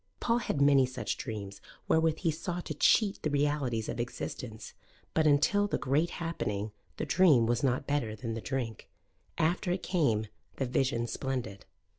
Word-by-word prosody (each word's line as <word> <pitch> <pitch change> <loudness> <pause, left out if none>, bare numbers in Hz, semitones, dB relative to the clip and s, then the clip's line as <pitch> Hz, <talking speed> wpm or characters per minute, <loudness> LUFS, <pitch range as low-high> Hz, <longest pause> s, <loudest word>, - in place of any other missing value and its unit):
Paul 235 0 +2
had 155 -10 -2
many 140 -2 +5
such 130 - -3
dreams 100 -5 -6 0.3
wherewith 160 -1 +3
he 165 -3 +2
sought 175 +3 -4
to 155 - -3
cheat 200 +7 +3
the 155 - 0
realities 140 -6 0
of - - -4
existence: 120 -1 -5 0.4
but 160 -1 +3
until 150 +8 +4
the - - -1
Great 150 +5 +1
Happening 105 - -3 0.3
the - - -2
dream 150 -9 +5
was 120 +1 +1
not 130 0 +1
better 130 -7 -1
than 115 +1 -4
the 115 - -4
drink: 120 -4 -4 0.5
after 170 +2 +1
it 180 - -2
came 140 - +1 0.3
the 135 - -1
Vision 125 -2 0
Splendid. 120 -6 -4
140 Hz, 165 wpm, -30 LUFS, 115-160 Hz, 0.5 s, many